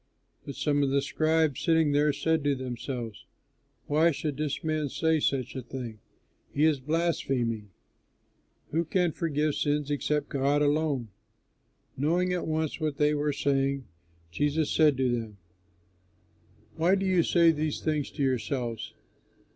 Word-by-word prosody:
But 140 - -5
some 145 -1 +1
of 140 - +2
the 140 0 +1
scribes 155 -1 +1
sitting 160 -3 +3
there 145 +1 +3
said 160 +2 0
to 145 -1 +2
themselves, 125 -3 -6 0.6
"Why 155 +3 +3
should 150 -2 -3
this 150 -2 -2
man 155 -2 -1
say 160 +3 +1
such 135 -3 -1
a 130 - -3
thing? 120 -3 -7 0.5
He 145 +2 +2
is 155 -3 +3
blaspheming! 130 -8 -1 1.0
Who 165 +3 +1
can 175 +1 +1
forgive 155 -2 0
sins 145 0 0
except 145 +1 -1
God 140 +2 +1
alone?" 145 -5 0 0.9
Knowing 175 +6 +1
at 180 - -2
once 160 0 -1
what 155 -3 -2
they 150 0 +3
were 150 0 0
saying, 140 -1 0 0.5
Jesus 145 - 0
said 150 -4 +4
to 130 -2 +1
them, 115 -4 -3 1.4
"Why 170 +4 +4
do 195 0 -1
you 185 -2 +3
say 170 0 +4
these 155 -1 -2
things 150 -3 -1
to 145 - -3
yourselves? 120 -2 -2
145 Hz, 145 wpm, -28 LUFS, 135-160 Hz, 1.4 s, said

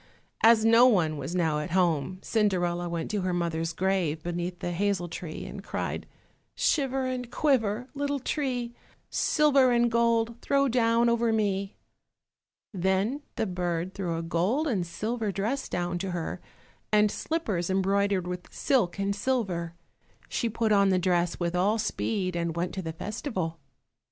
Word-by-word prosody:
As 225 -1 +6
no 230 +2 +7
one 175 -10 +3
was 170 +4 -4
now 160 -4 +1
at 150 - -4
home, 175 -2 +1
Cinderella 175 -5 0
went 170 +1 -3
to 210 -2 -1
her 180 -1 -1
mother's 165 -1 -1
grave 175 -3 0
beneath 175 +1 -3
the 175 - -3
hazel 185 0 0
tree, 165 -1 -6
and - - -8
cried, - - -4 0.5
"Shiver 270 -3 +1
and 250 -2 -3
quiver, 245 -5 +1
little 285 0 -1
tree, 250 -3 -2 0.4
Silver 280 -5 +4
and 240 -1 +3
gold 235 0 +1
throw 275 0 +2
down 235 -1 +3
over 235 -1 +2
me." 200 -3 0 1.0
Then 190 +8 0
the - - 0
bird 180 -1 -2
threw 175 -4 -2
a 165 - -3
gold 185 - 0
and 195 - 0
silver 215 +4 -2
dress 215 +8 -2
down 175 0 -2
to 195 +1 -3
her, 175 0 -4 0.5
and 210 -1 +4
slippers 210 - -2
embroidered 195 0 +1
with 180 0 -6
silk 210 -11 +1
and 200 0 0
silver. 195 -8 -1 0.5
She 235 - -1
put 225 0 0
on 200 -1 +5
the 185 - +3
dress 175 -1 +1
with 175 0 -1
all 200 +5 +2
speed, 205 -4 -1
and 170 -1 -1
went 175 +1 -2
to 190 - -3
the 160 -2 -4
festival. 185 - -4
195 Hz, 155 wpm, -28 LUFS, 175-235 Hz, 1.0 s, no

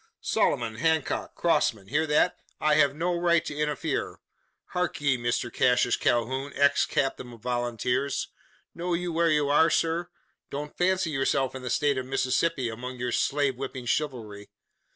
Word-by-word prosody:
Sloman! 115 -2 0
Hancock! 160 +2 0
Crossman! 100 -3 +1
hear 155 +4 +1
that? 150 0 +3 0.2
I 155 0 +3
have 145 -2 +4
no 175 +3 0
right 170 -1 +2
to 145 - -5
interfere! 150 0 -2 0.5
Hark 180 0 -2
ye, 140 -2 +2
Mr 120 0 -2
Cassius 125 -1 +3
Calhoun, 130 +2 0
ex 140 0 +3
captain 135 -4 -1
of 115 - -14
volunteers! 120 +2 -1 0.4
Know 175 0 -2
you 175 0 -3
where 165 +1 +3
you 150 -2 +2
are, 160 +3 +5
sir? 165 +2 0 0.4
Don't 145 +1 -6
fancy 185 -2 +1
yourself 135 -1 0
in 130 - -7
the 125 - -5
state 140 +2 +1
of 130 - -6
Mississippi 135 +1 0
among 125 +3 -6
your 125 0 -2
slave 140 0 +1
whipping 130 -1 -6
chivalry. 115 -7 -3
140 Hz, 155 wpm, -27 LUFS, 125-155 Hz, 0.5 s, are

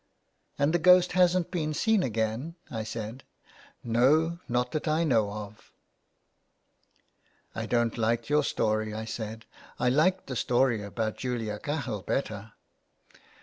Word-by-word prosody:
" - - -45
And 145 +3 +2
the 175 - +3
ghost 180 +1 +6
hasn't 180 -1 +3
been 155 -4 -2
seen 220 +2 +2
again? 115 +4 -2
" - - -28
I 110 -2 -3
said. 115 +3 -6 0.3
" - - -26
No, 150 +9 +3
not 125 +1 0
that 155 +1 -3
I 155 +2 +2
know 115 -9 +2
of." 105 0 -9 0.9
'* - - -47 0.7
I - - -4
don't 120 -1 0
like 115 +1 0
your 150 +1 +3
story," 110 -3 0
I 110 0 -4
said. 110 0 -6 0.2
'' - - -19
I 125 - +2
liked 175 +8 +2
the 130 - -5
story 120 -2 +2
about 110 +2 -3
Julia 115 -5 -3
Cahill 135 -8 -3
better." 110 -2 -3
120 Hz, 155 wpm, -28 LUFS, 110-155 Hz, 0.9 s, ghost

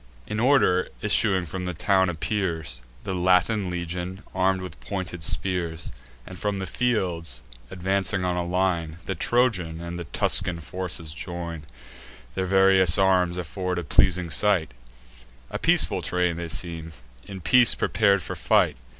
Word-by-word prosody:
In 105 +7 -3
order 120 -8 +3 0.2
issuing 100 -3 +3
from 90 +3 -5
the 90 -1 -4
town 95 +1 +2
appears 80 - -2 0.2
The 95 - -3
Latin 90 +3 +2
legion, 90 +2 -5
arm'd 95 0 +1
with 90 - -9
pointed 95 -3 -5
spears; 85 -2 -1 0.3
And - - -10
from 105 -1 -1
the 95 - -3
fields, 90 - -1 0.3
advancing 95 0 0
on 90 -1 0
a 90 - -1
line, 85 -3 -1
The 95 - -2
Trojan 95 -5 0
and 85 +1 -6
the 85 - -5
Tuscan 85 +3 +1
forces 85 -1 -3
join: 85 -3 -6 0.7
Their 95 0 -2
various 95 -2 +5
arms 90 -2 +3
afford 90 +1 -3
a 90 - -2
pleasing 90 +2 +2
sight; 90 -4 +2 0.8
A - - -3
peaceful - - +2
train 90 -1 0
they 85 0 -5
seem, 80 -1 -4 0.3
in 95 -1 -7
peace 120 +6 +5
prepar'd 100 -2 +2
for - - -5
fight. - - +2
90 Hz, 145 wpm, -25 LUFS, 85-95 Hz, 0.8 s, various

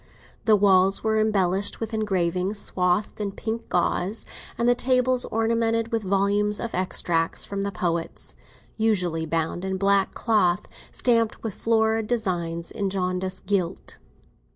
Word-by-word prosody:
The 220 - +6
walls 195 -1 +4
were 220 0 +2
embellished 200 -2 +1
with 225 0 -5
engravings 190 -2 0
swathed 185 +2 0
in 200 -1 -3
pink 225 +3 -5
gauze, 180 +4 0 0.3
and 235 - +1
the 245 - +6
tables 255 0 +2
ornamented 230 0 0
with 225 -1 0
volumes 200 +1 +1
of 235 - -4
extracts 170 -2 0
from 200 0 -4
the 200 0 -2
poets, 170 -3 -3 0.4
usually 180 -7 0
bound 165 +2 -1
in 190 0 -2
black 195 0 +2
cloth 195 -6 +2 0.3
stamped 230 -3 +1
with 220 -3 -3
florid 220 0 +1
designs 175 -8 -2
in 200 -3 -2
jaundiced 185 0 -3
gilt. 190 -3 -2
200 Hz, 135 wpm, -24 LUFS, 180-225 Hz, 0.4 s, The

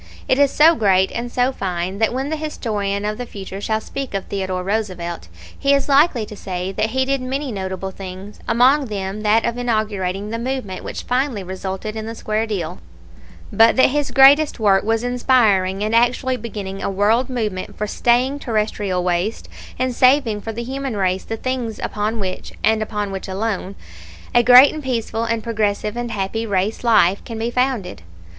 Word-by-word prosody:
It 260 - +2
is 285 -1 +5
so 315 +4 +6
great 190 - +2
and 235 +1 -4
so 250 +2 +1
fine 185 -3 -3
that 225 - +2
when 265 +4 -3
the - - 0
historian 210 -10 -3
of 210 +2 -3
the 245 - -5
future 195 -1 -8
shall 220 +1 0
speak 270 -1 -6
of 195 - -2
Theodore 185 -2 -3
Roosevelt 185 - -3 0.3
he 280 0 +3
is 275 - 0
likely 280 -5 +3
to 210 - -10
say 185 -1 -4
that 215 +3 -1
he 260 +3 0
did 275 0 0
many 265 +2 -3
notable 190 -1 -4
things, 190 +2 -9
among 255 +5 +4
them 200 -1 -4
that 215 +1 +3
of 235 +1 -2
inaugurating 210 -4 -2
the 230 - -3
movement 245 -6 -4
which - - -6
finally 250 -5 -1
resulted 190 +3 -5
in 220 0 -5
the 225 - -6
square 215 0 -2
deal, 180 - -4 0.7
but 225 +1 +5
that 260 - +5
his 290 0 0
greatest 285 +2 +5
work 195 -3 +3
was 225 +1 0
inspiring 220 -6 +2
and 215 +1 -1
actually 245 +2 +2
beginning 205 -5 -6
a - - -1
world 215 +6 +2
movement 215 -7 -3
for 210 - -1
staying 245 +6 +1
terrestrial 210 -6 -1
waste 180 +5 -1 0.3
and 255 0 -1
saving 255 -4 +3
for 225 - -5
the 235 +2 -5
human 265 -2 -4
race 185 -1 0
the 225 - -4
things 250 -3 -3
upon 215 +2 -2
which, 185 -2 -4
and 220 +1 +3
upon 210 -2 -3
which 190 -1 -5
alone, 195 0 -3 0.6
a 240 - +6
great 250 +3 +8
and 310 - -5
peaceful 230 -4 -2
and 230 -1 -1
progressive 210 -1 -1
and 240 0 -3
happy 210 +1 -2
race 200 +3 -1
life 200 -5 +4
can 230 - -7
be 230 +2 -2
founded. 250 - -1
220 Hz, 185 wpm, -20 LUFS, 195-250 Hz, 0.7 s, great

